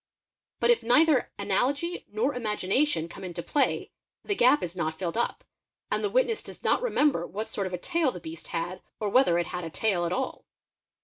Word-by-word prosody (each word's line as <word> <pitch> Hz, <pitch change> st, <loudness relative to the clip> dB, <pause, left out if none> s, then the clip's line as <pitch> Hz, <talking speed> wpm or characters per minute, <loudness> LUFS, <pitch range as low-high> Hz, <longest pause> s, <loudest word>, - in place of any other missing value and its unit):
But -, -, +4 dB
if 475 Hz, -, +3 dB
neither 275 Hz, +3 st, +4 dB
analogy 270 Hz, -, 0 dB
nor 235 Hz, +7 st, 0 dB
imagination 215 Hz, -, +1 dB
come 190 Hz, -, -10 dB
into 175 Hz, -2 st, -5 dB
_ -, -, -25 dB
play, 290 Hz, -, +1 dB, 0.3 s
the 410 Hz, -, +1 dB
gap 280 Hz, -5 st, +4 dB
is 175 Hz, 0 st, -4 dB
not 160 Hz, -3 st, -2 dB
filled 170 Hz, -2 st, -3 dB
up, 235 Hz, -, -1 dB, 0.5 s
and -, -, 0 dB
the 415 Hz, -, +1 dB
witness 470 Hz, -2 st, +1 dB
does -, -, -10 dB
not -, -, +3 dB
remember 295 Hz, -, +2 dB
what 215 Hz, +4 st, -5 dB
sort 195 Hz, -2 st, -2 dB
of 185 Hz, -, -7 dB
a -, -, -1 dB
tail 325 Hz, -, +1 dB
the 180 Hz, -, -8 dB
beast 160 Hz, 0 st, -8 dB
had 175 Hz, +2 st, -4 dB, 0.2 s
or 210 Hz, -, -1 dB
whether 225 Hz, -7 st, +4 dB
it 175 Hz, -, +1 dB
had 180 Hz, +1 st, -5 dB
a 165 Hz, -, -4 dB
tail 175 Hz, -1 st, 0 dB
at -, -, -4 dB
all. 260 Hz, +6 st, -3 dB
215 Hz, 205 wpm, -27 LUFS, 175-290 Hz, 0.5 s, But